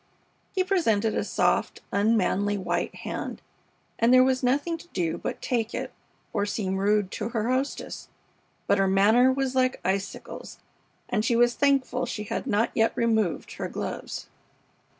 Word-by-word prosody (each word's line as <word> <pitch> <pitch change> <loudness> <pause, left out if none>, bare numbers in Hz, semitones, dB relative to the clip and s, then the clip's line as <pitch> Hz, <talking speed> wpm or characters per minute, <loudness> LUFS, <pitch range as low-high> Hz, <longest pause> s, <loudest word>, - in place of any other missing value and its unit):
He 375 - +3
presented 225 - +1
a - - 0
soft, - - 0
unmanly 205 -1 +2
white 190 - -2
hand, - - -5 0.6
and 230 +2 +4
there 255 0 +8
was 260 0 +2
nothing 285 +6 +1
to 345 - -14
do 170 - -2
but - - -5
take 235 -2 -1
it - - -4 0.4
or - - +1
seem 200 -2 -2
rude 205 0 +2
to 220 +1 -3
her 230 0 -1
hostess; 265 +2 -3 0.6
but 200 - +2
her 195 - +3
manner 215 +7 +5
was 265 -1 -1
like 255 0 +1
icicles, 195 +2 -3 0.5
and 215 -3 0
she 235 +1 +2
was 240 +1 +4
thankful 265 -2 +1
she 210 - -4
had 210 - -4
not 225 -1 +1
yet 225 0 +2
removed 220 -6 0
her - - -3
gloves. - - -5
230 Hz, 155 wpm, -26 LUFS, 205-255 Hz, 0.6 s, there